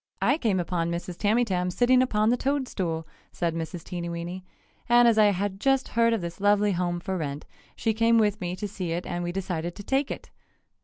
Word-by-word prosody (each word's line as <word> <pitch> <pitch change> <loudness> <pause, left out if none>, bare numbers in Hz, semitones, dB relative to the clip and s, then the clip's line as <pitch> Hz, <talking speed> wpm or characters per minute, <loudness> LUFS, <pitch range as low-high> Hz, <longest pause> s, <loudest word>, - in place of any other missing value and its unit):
"I 295 - +2
came 210 - +1
upon 170 -1 -1
Mrs. 170 +1 -4
Tamytam 205 -4 +1
sitting 250 +5 +4
upon 215 -4 +2
the - - +4
toad 275 +1 -1
stool," 165 -6 -3 0.2
said 170 -2 -1
Mrs. 165 +1 -5
Teenyweeny, 170 +1 -5 0.5
"and 240 0 +6
as 225 -2 +4
I 215 - +7
had 200 -1 0
just 270 +2 +2
heard 230 0 +3
of 225 -3 0
this 170 +2 -6
lovely 205 0 +3
home 175 -1 -1
for 190 +2 -3
rent, 145 -1 -4 0.3
she 225 - 0
came 230 +1 +3
with 210 -1 +2
me 180 0 -2
to 205 - -4
see 185 -4 -4
it 175 +1 -3
and 175 0 -3
we 175 - -2
decided 175 -2 -3
to 205 - -8
take 270 +5 0
it!" - - -7
195 Hz, 210 wpm, -26 LUFS, 175-225 Hz, 0.5 s, I